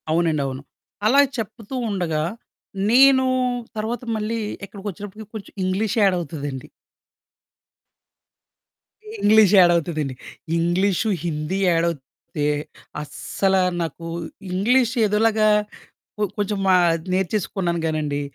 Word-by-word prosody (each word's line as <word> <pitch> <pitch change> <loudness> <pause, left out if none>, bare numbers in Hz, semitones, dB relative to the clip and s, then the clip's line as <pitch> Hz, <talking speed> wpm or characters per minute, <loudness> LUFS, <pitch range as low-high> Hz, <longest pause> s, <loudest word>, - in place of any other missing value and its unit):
అవునండి 160 -2 +1
అవును. 130 0 -5 0.5
అలా 275 +5 +6 0.2
చెప్తూ 225 +2 -6
ఉండగా, 170 -6 -1 0.7
నేను 260 +1 +6 0.5
తర్వాత 225 +3 -3
మళ్ళీ, 220 +2 -2 0.3
ఇక్కడికి 200 0 -9
వచ్చినప్పటికి 205 +3 -10
కొంచెం 210 - -8
ఇంగ్లీష్ 195 +3 0
యాడ్ 195 -2 +4
అవుతదండి. 145 -4 -6 2.5
ఇంగ్లీష్ 215 -1 +5
యాడ్ 175 -1 +7
అవుతుందండి. 155 -5 -2 0.4
ఇంగ్లీషు, 180 +5 +1 0.2
హిందీ 155 +3 -2
యాడ్ 165 -1 +2
అవుతే, 145 0 -5 0.6
అస్సల 190 +6 -1 0.3
నాకు 165 0 -5 0.5
ఇంగ్లీష్ 235 +6 +2
ఏదోలాగా 215 +1 +2 0.7
కొ 210 - 0
కొంచెం 205 0 -1
మా 185 - +6 0.4
నేర్చేసుకున్నాను 185 -2 -1
కానండి, 150 -2 -1
190 Hz, 100 wpm, -22 LUFS, 165-215 Hz, 2.5 s, యాడ్